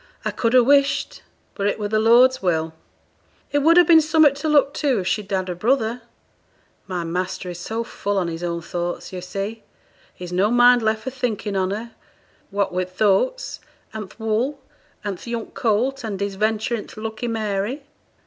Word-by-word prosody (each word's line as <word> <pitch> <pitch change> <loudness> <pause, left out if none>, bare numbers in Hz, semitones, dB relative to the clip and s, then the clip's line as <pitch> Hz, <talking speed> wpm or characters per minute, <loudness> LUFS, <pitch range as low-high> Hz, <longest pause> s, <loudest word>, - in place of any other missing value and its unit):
I - - 0
could 230 +1 0
ha' 250 - +7
wished 280 +1 +2 0.3
but 200 - -1
it 205 - 0
were 210 - -2
the 215 +1 +1
Lord's 245 +4 +5
will 165 -3 0 0.8
It 290 - +2
would 325 +4 +5
ha' 355 - +8
been 325 -2 +7
summut 310 -2 +4
to 310 +2 -2
look 285 -2 +4
to, 275 -5 +2
if 180 - -5
she'd 205 0 -1
had 190 -1 -1
a 180 - -2
brother. 230 +4 0 0.9
My 180 -2 -3
master 180 +2 -3
is 175 - -8
so 225 +6 -3
full 205 -3 -3
on 180 -3 0
his 165 0 -5
own 170 -1 -3
thoughts, 175 +2 -4
yo' 185 - -4
see, 195 +5 -5 0.5
he's 180 0 -8
no 190 +4 +2
mind 245 +1 +6
left 220 0 0
for 260 - -4
thinking 225 -5 -3
on 185 -1 +1
her, 220 +4 -5 0.6
what 200 -2 -1
wi' 185 0 0
th' 185 +2 -17
oats, - - +1 0.3
and 215 -3 -6
th' - - -19
wool, 225 +6 -1 0.4
and 200 -4 -4
th' - - -12
young 235 -1 -4
colt, 245 +5 0
and 205 -4 -4
his 200 0 -2
venture 220 +3 0
i' - - -4
th' - - -14
Lucky 220 +2 -4
Mary.' 220 +4 -2
220 Hz, 195 wpm, -22 LUFS, 190-250 Hz, 0.9 s, ha